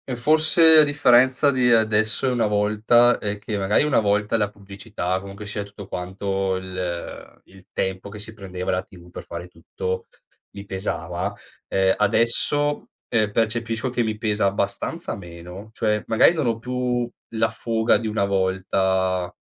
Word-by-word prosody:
forse 155 +4 +6
a - - +8
differenza 130 -1 +4
di 125 -3 +2
adesso 110 +2 +2
e - - +3
una 120 -3 +1
volta 105 +4 +3
è 105 0 -3
che 105 0 -4
magari 100 +5 +2
una 135 -6 +3
volta 105 +2 +1
la 105 -2 +1
pubblicità, 100 -2 -5
comunque 100 +1 -9
sia 105 0 -4
tutto 100 0 -11
quanto 95 +1 -2
il 90 -2 -6
il 95 0 -19
tempo 95 +1 -3
che 105 +1 -9
si 110 +1 -8
prendeva 95 -3 -5
la 90 +1 -1
TV 90 -2 -16
per - - -9
fare 85 +1 -8
tutto 90 +2 -5 0.5
mi 100 - -8
pesava, 90 -3 -4 0.4
ehm, 95 0 +2
adesso, 115 +7 +1 0.2
ehm, 110 -3 +1
percepisco 115 +2 -1
che 120 -1 0
mi 110 -1 -2
pesa 105 -2 0
abbastanza 100 0 -2
meno. 90 +3 -10
Cioè 105 -1 -1
magari 115 +8 +5
non 155 -6 -1
ho 115 -1 0
più 125 0 -2 0.3
la 110 0 +2
fuga 110 0 +1
di 110 +1 -1
una 105 -2 0
volta 95 -1 0
105 Hz, 155 wpm, -23 LUFS, 95-115 Hz, 0.5 s, a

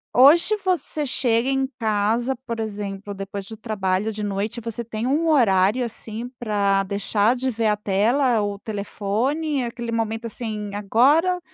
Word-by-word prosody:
Hoje 310 - +6
você 345 -4 +1
chega 250 -2 +1
em 270 0 +1
casa, 225 +4 +1
por 230 -2 -4
exemplo, 205 -2 -5
depois 195 0 -6
de 220 - -10
o - - -9
trabalho 210 -1 -1
de 210 0 -5
noite, 205 +3 -2
você 230 +1 -4
tem 220 0 -4
um 300 +6 +1
horário, 230 -5 +3
assim, 225 +1 -6
para 200 -4 +1
deixar 205 +4 +1
de 260 +1 -1
ver 225 -1 0
a 210 - +3
tela, 225 +5 +2
o 205 -1 -2
telefone, 225 +8 -2
aquele 235 0 -5
momento 225 0 -2
assim: 215 -2 -5
"Agora 280 - +3
225 Hz, 155 wpm, -23 LUFS, 205-255 Hz, -, Hoje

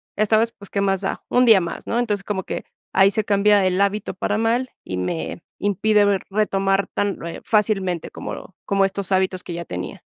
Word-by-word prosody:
esta 215 +1 +3
vez, 230 +1 +2
pues, 200 -3 -12
¿qué 200 - -1
más 195 -1 +1
da?, 195 - -3
un 250 0 +4
día 220 -6 +7
más", 170 - -5
¿no?, 235 - 0
entonces, 205 -5 -1
como 190 -2 -3
que - - -5 0.3
ahí 195 +1 +5
se 215 +1 0
cambia 205 -1 +3
el 185 +1 0
hábito 200 +1 0
para 205 +2 -1
mal, 235 +3 +1
y 90 - -5
me 160 - -3 0.2
impide 205 +1 +3
ver 200 -2 +2
retomar 195 -1 +1
tan, 205 -4 -2
eh, 170 - -7
fácilmente 195 -6 +1
como 190 - -8
como 195 -1 +2
estos 195 0 -3
hábitos 185 -1 +1
que 175 - -6
ya 170 0 -5
tenía. 90 -7 -6
200 Hz, 205 wpm, -22 LUFS, 190-210 Hz, 0.3 s, día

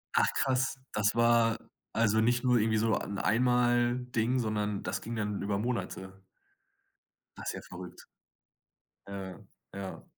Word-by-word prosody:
Ach, - - +5
krass, 135 0 +1
das 105 +1 +1
war 120 -1 +4 0.3
also 110 -1 +3
nicht 120 +2 +2
nur 125 -1 +4
irgendwie 110 0 +2
so 110 +1 +2
'n 100 - -4
Einmalding, 120 +1 +2
sondern 105 -3 -1
das - - -2
ging 115 +1 -5
dann 105 -2 -2
über 100 0 0
Monate. 95 -4 -4 1.1
Das - - -4
ja - - -6
verrückt. 90 0 -10 1.0
Ja, 95 -2 -6 0.3
ja. 100 -1 -6
110 Hz, 130 wpm, -31 LUFS, 100-120 Hz, 1.1 s, Ach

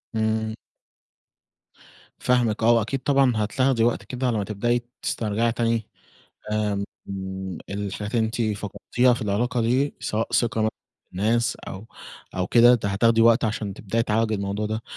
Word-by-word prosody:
إمم. 110 0 0 1.6
فاهمِك 120 -3 +1
آه 120 - +6
وأكيد 115 +4 +1
طبعًا 135 -2 +3
هتاخدي 115 +3 +1
وقت 120 - +1
كده 125 0 -3
على 115 -3 +1
ما 100 - 0
تبدئي 120 +4 0 0.2
تسترجعي 115 +1 0
تاني 115 -2 0 0.7
آآ 105 -1 0 0.4
آمم 95 -2 -5
الحاجات 100 +1 -4
اللي 115 - +3
أنتِ 115 +2 -3 0.2
فقدتيها 120 +5 +1
في 120 - -4
العلاقة 115 +4 0
دي، 130 +5 +1
سواء 110 +1 -1
ثقة 115 -2 +2
مثلًا 110 - +2 0.4
في - - -52
الناس 115 +6 +1
أو 95 +3 -7 0.5
أو 90 0 -1
كده 120 +1 +7
ت 110 - -4
هتاخدي 115 +3 +3
وقت 115 0 +5
عشان 105 -2 -2
تبدئي 115 +4 -1
تعالجي 110 0 +1
الموضوع 100 +1 -2
ده، 110 +1 -3
110 Hz, 150 wpm, -24 LUFS, 105-120 Hz, 1.6 s, كده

